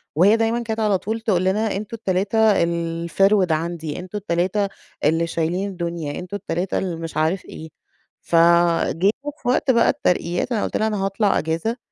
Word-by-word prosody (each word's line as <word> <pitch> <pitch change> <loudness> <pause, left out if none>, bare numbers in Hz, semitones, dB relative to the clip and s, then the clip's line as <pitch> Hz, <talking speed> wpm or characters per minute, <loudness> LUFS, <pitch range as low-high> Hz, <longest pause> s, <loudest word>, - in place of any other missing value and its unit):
وهي 195 +7 +5
دايمًا 230 +1 0
كانت 220 0 -3
على 210 -3 +2
طول 220 +4 -4
تقول 195 -5 +1
لنا 210 +2 0
أنتم 210 +3 -5
ال3 205 0 +2
الفِرْوِد 170 +3 +1
عندي، 160 -1 -2
أنتم 185 +3 -6
ال3 195 +2 0 0.3
اللي 165 +3 +2
شايلين 175 +5 -1
الدنيا، 170 -5 -4
أنتم 185 +3 -5
ال3 180 0 -2
اللي 180 -3 -2
مش 165 -1 -6
عارف 160 +5 0
إيه. 160 0 -9 0.5
فجيتوا 170 - +2
في - - -7
وقت 260 +1 +3
بقى 235 -1 +4
الترقيات، 180 -5 0
أنا 220 - 0
قُلت - - -1
لها: 220 - +1
"أنا 205 -3 -1
هاطلع 195 +1 +1
أجازة." 165 +10 -2
185 Hz, 165 wpm, -22 LUFS, 170-215 Hz, 0.5 s, وهي